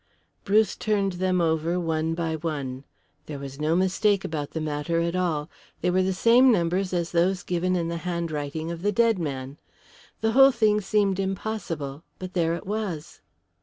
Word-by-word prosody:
Bruce 210 Hz, +2 st, +3 dB
turned 205 Hz, -2 st, 0 dB
them 185 Hz, -1 st, +2 dB
over 165 Hz, +1 st, +1 dB
one 160 Hz, -1 st, -1 dB
by 165 Hz, -1 st, -1 dB
one. 140 Hz, -5 st, -4 dB, 0.4 s
There 150 Hz, -, -5 dB
was 140 Hz, 0 st, -8 dB
no 155 Hz, +2 st, +2 dB
mistake 195 Hz, +2 st, +2 dB
about 150 Hz, -3 st, -3 dB
the 160 Hz, -, -4 dB
matter 155 Hz, +2 st, -1 dB
at 170 Hz, +1 st, -1 dB
all. 165 Hz, -5 st, 0 dB, 0.3 s
They 180 Hz, -, +1 dB
were 185 Hz, +1 st, +3 dB
the 185 Hz, +1 st, +1 dB
same 235 Hz, +7 st, +5 dB
numbers 180 Hz, -1 st, +1 dB
as 170 Hz, -2 st, -1 dB
those 180 Hz, +2 st, +1 dB
given 180 Hz, +1 st, 0 dB
in 170 Hz, -2 st, 0 dB
the 170 Hz, 0 st, -3 dB
handwriting 165 Hz, -2 st, -3 dB
of 170 Hz, -1 st, -6 dB
the 205 Hz, +2 st, +1 dB
dead 225 Hz, -1 st, +3 dB
man. 140 Hz, -2 st, -5 dB, 0.6 s
The 225 Hz, 0 st, +2 dB
whole 270 Hz, +3 st, +7 dB
thing 215 Hz, -3 st, +2 dB
seemed 200 Hz, -1 st, +1 dB
impossible, 190 Hz, -7 st, -3 dB
but 185 Hz, 0 st, -7 dB
there 170 Hz, -2 st, +1 dB
it 170 Hz, -, -8 dB
was. 195 Hz, -7 st, -4 dB
175 Hz, 175 wpm, -25 LUFS, 160-195 Hz, 0.6 s, whole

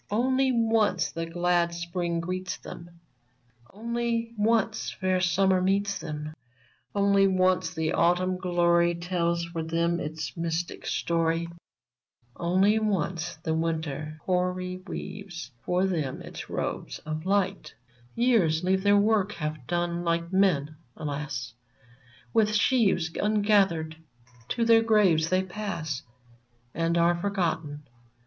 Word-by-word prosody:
Only 260 Hz, +4 st, +2 dB
once 225 Hz, -5 st, +2 dB
the 165 Hz, 0 st, -4 dB
glad 175 Hz, 0 st, +1 dB
Spring 170 Hz, 0 st, -2 dB
greets 185 Hz, +2 st, -4 dB
them; 170 Hz, 0 st, -10 dB, 0.8 s
Only 235 Hz, +1 st, -2 dB
once 220 Hz, 0 st, +1 dB
fair 185 Hz, -1 st, 0 dB
Summer 185 Hz, +1 st, +3 dB
meets 200 Hz, +2 st, +1 dB
them; 150 Hz, 0 st, -6 dB, 0.6 s
Only 200 Hz, -1 st, +4 dB
once 185 Hz, -1 st, +1 dB
the 160 Hz, 0 st, -1 dB
Autumn 180 Hz, +2 st, +2 dB
glory 175 Hz, -1 st, +2 dB
Tells 170 Hz, -1 st, -1 dB
for 170 Hz, -1 st, -5 dB
them 170 Hz, +1 st, 0 dB
its 155 Hz, -1 st, -5 dB
mystic 165 Hz, 0 st, -3 dB
story; 165 Hz, 0 st, 0 dB, 0.9 s
Only 190 Hz, +5 st, +2 dB
once 185 Hz, -5 st, -1 dB
the 160 Hz, -, 0 dB
Winter 160 Hz, -2 st, -2 dB
hoary 180 Hz, 0 st, -1 dB
Weaves 180 Hz, -9 st, -7 dB
for 180 Hz, +1 st, +1 dB
them 155 Hz, -8 st, -2 dB
its -, -, -8 dB
robes -, -, -3 dB
of 155 Hz, +3 st, -4 dB
light! 195 Hz, -1 st, 0 dB
Il8 125 Hz, 0 st, -37 dB
VERMONT 120 Hz, 0 st, -30 dB, 0.2 s
Years 175 Hz, -9 st, +3 dB
leave 190 Hz, +1 st, +2 dB
their 205 Hz, +1 st, +4 dB
work 205 Hz, -1 st, +2 dB
half 150 Hz, -5 st, -5 dB
done; 175 Hz, 0 st, -1 dB
like 170 Hz, +1 st, -1 dB
men, 155 Hz, -6 st, +2 dB, 0.2 s
alas! 145 Hz, -5 st, -4 dB, 0.8 s
With 215 Hz, -1 st, +3 dB
sheaves 210 Hz, -8 st, +2 dB
ungathered 200 Hz, -7 st, +2 dB, 0.5 s
to 235 Hz, -1 st, 0 dB
their 230 Hz, 0 st, +6 dB
graves 195 Hz, -8 st, +3 dB
they 185 Hz, 0 st, +2 dB
pass, 175 Hz, -8 st, -4 dB, 0.7 s
And 165 Hz, +1 st, 0 dB
are 170 Hz, +1 st, +4 dB
forgotten. 170 Hz, -6 st, -2 dB
175 Hz, 125 wpm, -27 LUFS, 165-200 Hz, 0.9 s, their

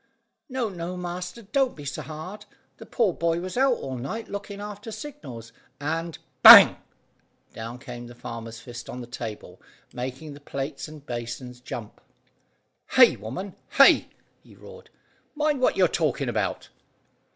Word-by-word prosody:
"No, 255 Hz, -3 st, -1 dB
no, 180 Hz, -2 st, -5 dB
master; 180 Hz, +4 st, -6 dB
don't 260 Hz, +5 st, 0 dB
be 145 Hz, -, -10 dB
so 140 Hz, -, -4 dB
hard. 180 Hz, +7 st, -8 dB, 0.3 s
The -, -, -12 dB
poor 220 Hz, -8 st, +1 dB
boy 165 Hz, 0 st, 0 dB
was 185 Hz, +1 st, -6 dB
out 265 Hz, 0 st, +3 dB
all 130 Hz, -, -6 dB
night 220 Hz, -, -5 dB
looking 200 Hz, 0 st, -6 dB
after 210 Hz, +2 st, -7 dB
signals 210 Hz, -, -9 dB, 0.3 s
and 165 Hz, +2 st, -3 dB
" -, -, -44 dB
Bang! -, -, +11 dB, 0.8 s
Down 115 Hz, +2 st, -7 dB
came 120 Hz, -2 st, -9 dB
the 120 Hz, -, -12 dB
farmer's 115 Hz, -1 st, -8 dB
fist 120 Hz, 0 st, -9 dB
on 125 Hz, -, -6 dB
the -, -, -7 dB
table 115 Hz, -3 st, -8 dB, 0.3 s
making 130 Hz, +5 st, -6 dB
the 145 Hz, -, -12 dB
plates 140 Hz, +1 st, -5 dB
and 155 Hz, -2 st, -12 dB
basins 120 Hz, 0 st, -6 dB
jump. 115 Hz, -3 st, -8 dB, 0.9 s
"Hay, -, -, +7 dB
woman, 135 Hz, -, -7 dB, 0.2 s
hay!" -, -, +7 dB, 0.3 s
he -, -, -18 dB
roared. 475 Hz, -1 st, -14 dB, 0.5 s
"Mind 300 Hz, -2 st, 0 dB
what -, -, +2 dB
you're -, -, +5 dB
talking -, -, -1 dB
about!" -, -, -2 dB
155 Hz, 150 wpm, -25 LUFS, 125-205 Hz, 0.9 s, Bang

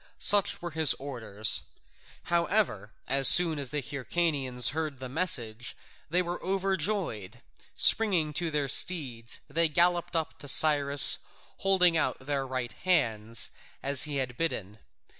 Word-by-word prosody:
Such 205 Hz, -3 st, +4 dB
were 175 Hz, -, -6 dB
his 160 Hz, -1 st, +5 dB
orders. 110 Hz, -6 st, +1 dB, 0.6 s
However, 170 Hz, -, -2 dB, 0.2 s
as 135 Hz, 0 st, +2 dB
soon 165 Hz, -4 st, +5 dB
as 135 Hz, -3 st, -5 dB
the 145 Hz, 0 st, -5 dB
Hyrcanians 140 Hz, -3 st, 0 dB
heard 155 Hz, -2 st, -6 dB
the 130 Hz, -, -8 dB
message, 125 Hz, -7 st, -2 dB, 0.3 s
they 180 Hz, +3 st, -1 dB
were 175 Hz, 0 st, -7 dB
overjoyed: 190 Hz, -, -4 dB, 0.3 s
springing 180 Hz, -9 st, +2 dB
to 165 Hz, +3 st, -4 dB
their 150 Hz, -2 st, -3 dB
steeds 130 Hz, -7 st, 0 dB
they 165 Hz, +3 st, 0 dB
galloped 175 Hz, +2 st, -1 dB
up 160 Hz, -1 st, -5 dB
to 145 Hz, -, -10 dB
Cyrus, 140 Hz, +1 st, +5 dB, 0.4 s
holding 180 Hz, -3 st, +1 dB
out -, -, -2 dB
their 140 Hz, -1 st, -4 dB
right 130 Hz, -2 st, -6 dB
hands 115 Hz, -, -1 dB, 0.3 s
as 140 Hz, 0 st, +4 dB
he 150 Hz, -1 st, -6 dB
had 130 Hz, -3 st, -5 dB
bidden. 110 Hz, -, -5 dB
145 Hz, 135 wpm, -26 LUFS, 130-175 Hz, 0.6 s, his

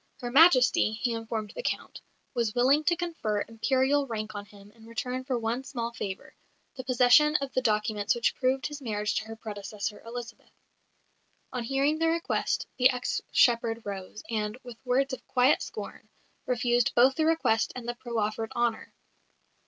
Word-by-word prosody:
Her 245 Hz, -3 st, -5 dB
Majesty, 255 Hz, -7 st, +5 dB
he 235 Hz, +2 st, -1 dB
informed 225 Hz, -2 st, -4 dB
the -, -, -4 dB
Count, -, -, -4 dB, 0.3 s
was 235 Hz, -4 st, -1 dB
willing 270 Hz, +5 st, +4 dB
to 345 Hz, 0 st, +3 dB
confer 325 Hz, -13 st, -2 dB
Imperial 265 Hz, +5 st, +1 dB
rank 215 Hz, -2 st, -4 dB
on 205 Hz, 0 st, -7 dB
him 205 Hz, 0 st, -16 dB
in 225 Hz, 0 st, -17 dB
return 250 Hz, +3 st, -4 dB
for 260 Hz, -2 st, -1 dB
one 235 Hz, +3 st, -2 dB
small 235 Hz, -4 st, -4 dB
favour 195 Hz, -4 st, -6 dB, 0.4 s
the 260 Hz, -, -6 dB
possession 255 Hz, +4 st, +5 dB
of 275 Hz, -2 st, -1 dB
the 255 Hz, -, +1 dB
documents 215 Hz, -1 st, +1 dB
which 235 Hz, -, +1 dB
proved 260 Hz, +1 st, 0 dB
his 295 Hz, -1 st, -5 dB
marriage 210 Hz, -4 st, -2 dB
to -, -, -2 dB
her 225 Hz, 0 st, -8 dB
predecessor, 210 Hz, -1 st, -6 dB
Elizabeth. 235 Hz, +1 st, -8 dB, 1.0 s
On 250 Hz, -2 st, -2 dB
hearing 275 Hz, +5 st, +1 dB
the 330 Hz, -, +2 dB
request, 335 Hz, +1 st, -1 dB
the 255 Hz, +1 st, +7 dB
ex 250 Hz, -1 st, -2 dB
shepherd 230 Hz, -1 st, +3 dB
rose, 200 Hz, +1 st, -7 dB
and, 215 Hz, 0 st, -2 dB
with 245 Hz, -2 st, -11 dB
words 265 Hz, +2 st, +1 dB
of -, -, -6 dB
quiet 255 Hz, +3 st, +3 dB
scorn, -, -, -8 dB, 0.4 s
refused 245 Hz, -1 st, +2 dB
both 255 Hz, +2 st, +6 dB
the 315 Hz, +3 st, 0 dB
request 320 Hz, -9 st, +2 dB
and 245 Hz, -2 st, -7 dB
the 240 Hz, -, -1 dB
proffered 225 Hz, -2 st, -3 dB
honour. 240 Hz, -2 st, -1 dB
240 Hz, 170 wpm, -28 LUFS, 220-265 Hz, 1.0 s, the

